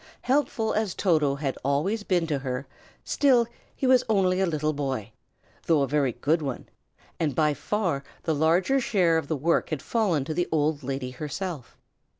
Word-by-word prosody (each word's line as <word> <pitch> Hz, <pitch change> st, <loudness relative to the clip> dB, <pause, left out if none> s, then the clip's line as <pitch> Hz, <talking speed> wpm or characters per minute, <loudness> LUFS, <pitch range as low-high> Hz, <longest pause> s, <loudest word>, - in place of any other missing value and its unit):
Helpful 250 Hz, -5 st, +1 dB
as 215 Hz, -3 st, -1 dB
Toto 155 Hz, -7 st, +2 dB
had 140 Hz, -2 st, -3 dB
always 150 Hz, -, 0 dB
been 180 Hz, -4 st, +1 dB
to 150 Hz, -4 st, -1 dB
her, 130 Hz, 0 st, -4 dB, 0.4 s
still, 255 Hz, -5 st, +3 dB, 0.3 s
he -, -, -2 dB
was 255 Hz, -1 st, +5 dB
only 190 Hz, -3 st, +2 dB
a 190 Hz, -, +2 dB
little 155 Hz, -2 st, 0 dB
boy, 135 Hz, -7 st, -3 dB, 0.6 s
though 155 Hz, -4 st, +4 dB
a -, -, 0 dB
very 140 Hz, -2 st, +1 dB
good 150 Hz, +7 st, +1 dB
one; 135 Hz, -4 st, -4 dB, 0.5 s
and 150 Hz, -5 st, 0 dB
by 150 Hz, 0 st, +3 dB
far 175 Hz, -5 st, -1 dB, 0.2 s
the 160 Hz, -, 0 dB
larger 170 Hz, -, +2 dB
share 180 Hz, -9 st, +2 dB
of 150 Hz, -, -8 dB
work 160 Hz, +2 st, +1 dB
had 155 Hz, -4 st, -3 dB
fallen 190 Hz, -, +1 dB
to 155 Hz, -, -3 dB
the 175 Hz, +2 st, -1 dB
old 155 Hz, -1 st, +1 dB
lady 135 Hz, -1 st, -4 dB
herself. 150 Hz, +1 st, -6 dB
160 Hz, 170 wpm, -26 LUFS, 140-190 Hz, 0.6 s, was